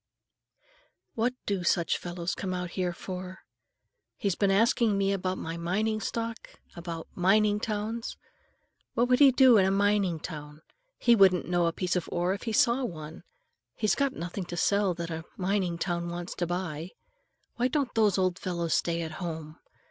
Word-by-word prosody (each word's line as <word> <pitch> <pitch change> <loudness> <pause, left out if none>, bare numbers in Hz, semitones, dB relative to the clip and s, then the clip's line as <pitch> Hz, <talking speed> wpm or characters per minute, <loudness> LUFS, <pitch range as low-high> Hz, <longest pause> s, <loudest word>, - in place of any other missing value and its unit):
What 240 +3 0
do 195 -3 -1
such 170 -1 +1
fellows 175 0 -4
come 185 -2 -3
out 180 -1 -4
here 180 -1 -1
for? 185 +1 -7 0.8
He's 200 -2 0
been 200 +3 +1
asking 220 +1 +3
me 195 0 +2
about 185 -1 -2
my 165 +1 -5
mining 215 +6 -1
stock, 230 0 -5
and - - -25
about 170 -1 -6
mining 205 +3 +3
towns. 220 +2 -3 0.8
What 240 +1 +3
would 250 - +4
he 285 -2 +9
do 255 -2 +6
in 190 - +5
a - - +3
mining 200 -3 +2
town? 150 -1 -8 0.3
He 235 -1 +5
wouldn't 190 -4 +5
know 175 -1 +2
a - - +1
piece 180 +2 -2
of 180 - -2
ore 175 +1 +1
if 195 - -6
he 225 - -1
saw 235 +4 +3
one. 160 -8 -6 0.5
He's 215 - +1
got 275 -1 0
nothing 180 0 -5
to 175 0 -6
sell 200 0 +2
that 170 0 -5
a 160 0 -4
mining 185 -2 0
town 170 0 -2
wants 175 +1 -5
to 175 - -1
buy. 175 -2 -3 0.7
Why 245 +1 +2
don't 275 -2 -1
those 210 -4 +3
old 185 -1 +1
fellows 170 -3 -2
stay 170 0 0
at 160 - -5
home? 160 -2 -6
185 Hz, 180 wpm, -28 LUFS, 170-210 Hz, 0.8 s, he